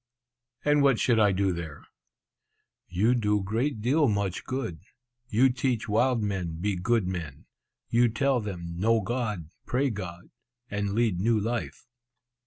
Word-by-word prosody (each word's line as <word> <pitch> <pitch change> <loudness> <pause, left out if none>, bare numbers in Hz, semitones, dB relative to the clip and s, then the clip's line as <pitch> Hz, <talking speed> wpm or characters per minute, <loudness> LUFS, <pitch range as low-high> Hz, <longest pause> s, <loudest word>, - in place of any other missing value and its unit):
"And 145 0 +4
what 135 -4 +4
should 120 -3 +3
I 105 -2 +5
do 95 0 +1
there?" 85 -4 -7 1.0
"You 100 +7 +2
do 105 -4 +1
great 115 +4 -1
deal 140 +6 +3
much 100 -3 -1
good! 125 -11 -3 0.5
you 125 +5 +4
teach 125 -2 -1
wild 115 +2 +2
men 90 -6 -3
be 100 +2 0
good 110 +3 +1
men; 85 -6 -5 0.4
you 120 +1 +3
tell 135 +3 +1
them 85 -5 -6
know 115 +3 +3
God, 105 -7 -3 0.2
pray 135 +2 +1
God, 90 -4 -7 0.4
and 100 -1 -1
lead 110 -6 +1
new 110 +3 +2
life." 115 +3 -3
105 Hz, 145 wpm, -27 LUFS, 95-120 Hz, 1.0 s, I